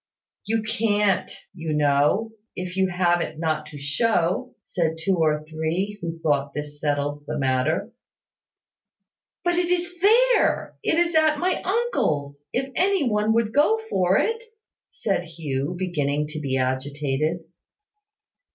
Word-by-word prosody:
"You 220 0 0
can't, 210 -3 +1 0.2
you 165 -4 -4
know, 150 +9 +2 0.2
if 180 0 -5
you 190 0 +2
have 175 -1 +2
it 160 - -4
not 155 -1 -1
to 150 - -10
show," 175 - 0
said 165 -2 -1
two 180 +3 0
or 155 -2 +2
three, 160 +6 -3
who 165 -1 -4
thought 145 -3 0
this 150 0 -6
settled 145 0 -1
the - - -3
matter. 130 +3 0 1.5
"But 350 0 +2
it 355 -1 0
is 355 0 -1
there: 475 +6 +3
it - - +1
is 345 0 +2
at 315 -1 +4
my 360 +4 0
uncle's, 150 - -1
if 265 +1 -2
any 370 -5 +2
one 210 0 +2
would 225 -1 +1
go 375 +10 +4
for 185 0 +3
it," 455 0 0 0.5
said 195 -4 -1
Hugh, 160 -2 -3
beginning 150 -5 -1
to 155 0 -5
be 135 -3 -1
agitated. 140 +5 -1
175 Hz, 140 wpm, -24 LUFS, 150-230 Hz, 1.5 s, at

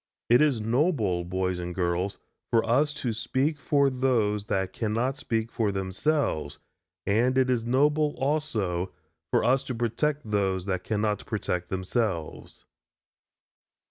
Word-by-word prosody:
It 120 - +7
is 145 -6 +3
noble, 115 - +1
boys 90 0 -1
and 90 0 -5
girls, 90 +2 -1 0.3
for 115 -1 +2
us 140 +6 +3
to 125 -6 -2
speak 135 +7 -1
for 140 -1 +2
those 115 -6 +1
that 95 -3 -1
cannot 115 +4 -1
speak 115 -2 -2
for 110 -3 0
themselves, 95 - -1 0.5
and 120 +6 +2
it 130 -1 +3
is 115 -2 0
noble, 150 +4 +2
also, 110 - -1 0.4
for - - +2
us 130 +3 +3
to 125 - -4
protect 120 +3 -1
those 95 -3 0
that 95 -2 -2
cannot 105 -1 -1
protect 90 -5 -2
themselves. 95 -2 -3
115 Hz, 135 wpm, -27 LUFS, 95-130 Hz, 0.5 s, It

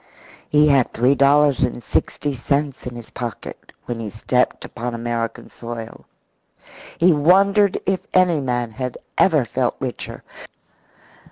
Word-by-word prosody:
He 150 0 +4
had 135 -4 +3
three 125 +4 +3
dollars 140 0 +4
and 120 -1 -1
sixty 145 +6 -1
cents 140 +1 -2
in 125 - -6
his 120 -2 -10
pocket 120 -2 -7
when 120 -2 -4
he 110 -2 -4
stepped 125 +4 0
upon 120 +1 -5
American 115 0 -3
soil. 115 -1 -9 0.9
He 175 +1 +5
wondered 195 +6 +4
if 190 0 +1
any 180 -4 +3
man 120 -3 -2
had 125 +2 -5 0.2
ever - - +4
felt - - -1
richer. - - -6
130 Hz, 135 wpm, -21 LUFS, 120-150 Hz, 0.9 s, He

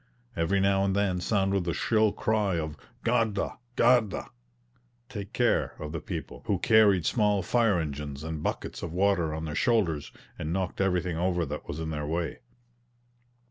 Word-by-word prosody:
Every 85 +4 +1
now 95 0 +3
and 100 0 +1
then 95 -3 +1
sounded 95 -1 +1
the 85 -1 -2
shrill 110 -2 +2
cry 105 -4 0
of 80 -2 -3 0.3
"Guarda! 115 -3 0 0.2
guarda!" 120 -4 +3 0.8
(take 100 -4 -6
care) 120 -1 +1
of 75 -1 -6
the 80 -1 -4
people, - - -6
who - - +2
carried 105 -6 +4
small 105 -4 +2
fire 115 -6 +3
engines 75 -2 -4
{330b} - - -5
and 80 -2 -4
buckets - - -3
of 80 - -5
water 90 -3 +2
on 80 +1 -4
their 75 - -4
shoulders, 85 -5 +1 0.3
and 75 - -3
knocked 95 +1 -2
everything 90 -3 0
over 90 0 +1
that 75 +1 -6
was 75 - -5
in 80 -1 -3
their 75 -1 -3
way. 85 +1 -2
95 Hz, 170 wpm, -28 LUFS, 80-105 Hz, 0.8 s, carried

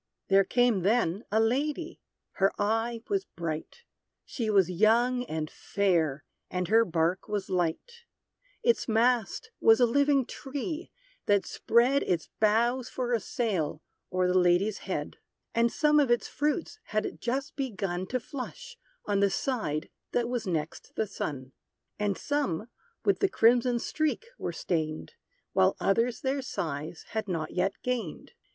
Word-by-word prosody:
There 195 0 +6
came, 245 0 +3
then, 205 0 +1
a 220 - +3
lady; 290 +8 0 0.4
her 195 +1 +4
eye 225 +2 0
was 395 -1 0
bright 165 - -5 0.4
She 230 -4 -3
was 195 -4 +4
young 235 +6 +3
and 155 -4 -3
fair, 165 -7 0 0.3
and 180 -1 -2
her 225 +2 +6
bark 170 -1 0
was 205 -3 -3
light; 185 - -2 0.6
Its 470 0 +2
mast 240 - +1
was 225 +1 +6
a 245 - +6
living 280 +2 +3
tree, 295 +7 -5 0.4
that 205 -1 +3
spread 250 +4 +3
Its 170 -3 -1
boughs 235 +4 +2
for 245 -1 -2
a 235 - +3
sail, 190 -9 -2 0.3
o'er 185 0 +1
the 180 - +2
lady's 180 +4 +3
head. 150 -5 -3 0.4
And 235 0 +3
some 300 -1 +4
of 280 -4 +3
its 240 0 +2
fruits 300 +8 -2
had 215 0 -2
just 270 +5 -2
begun 195 -9 -3
To 255 - -1
flush, 475 - -8 0.3
on 205 -1 +1
the 200 0 +4
side 190 - -2 0.3
that 240 -1 +1
was 240 -3 -2
next 160 -3 -3
the 220 - +1
sun; 140 -9 -5 0.5
And 205 -2 0
some 235 - -1 0.4
with 400 - +3
the 395 - +3
crimson 240 -2 +4
streak 310 - -1
were - - -2
stained; 155 - -3 0.4
While 95 - +4
others 230 +4 +1
their 270 +1 0
size 160 - -4
had 220 -1 -3
not 165 -4 -2
yet 185 +2 0
gained. 235 -10 -3
225 Hz, 145 wpm, -29 LUFS, 180-255 Hz, 0.6 s, There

